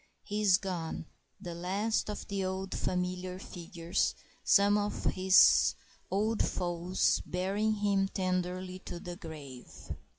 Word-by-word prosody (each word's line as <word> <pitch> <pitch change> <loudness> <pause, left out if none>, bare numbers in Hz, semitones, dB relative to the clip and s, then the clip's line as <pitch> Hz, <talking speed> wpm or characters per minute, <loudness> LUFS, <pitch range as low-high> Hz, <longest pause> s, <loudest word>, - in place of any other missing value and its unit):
He 210 0 -3
is 195 -3 +6
gone, 175 -4 -4 0.3
the 175 - -6
last 195 +7 -1
of 210 - -5
the 200 -1 -2
old 190 +1 -3
familiar 180 0 -2
figures, 170 -2 -2 0.3
some 200 0 +5
of 205 0 -1
his 185 0 +5 0.3
old 215 +3 +1
foes 175 +1 0
bearing 195 +4 0
him 200 -2 +1
tenderly 185 0 -2
to 175 - -7
the 175 0 -7
grave. 150 -8 -10
185 Hz, 125 wpm, -31 LUFS, 180-200 Hz, 0.3 s, is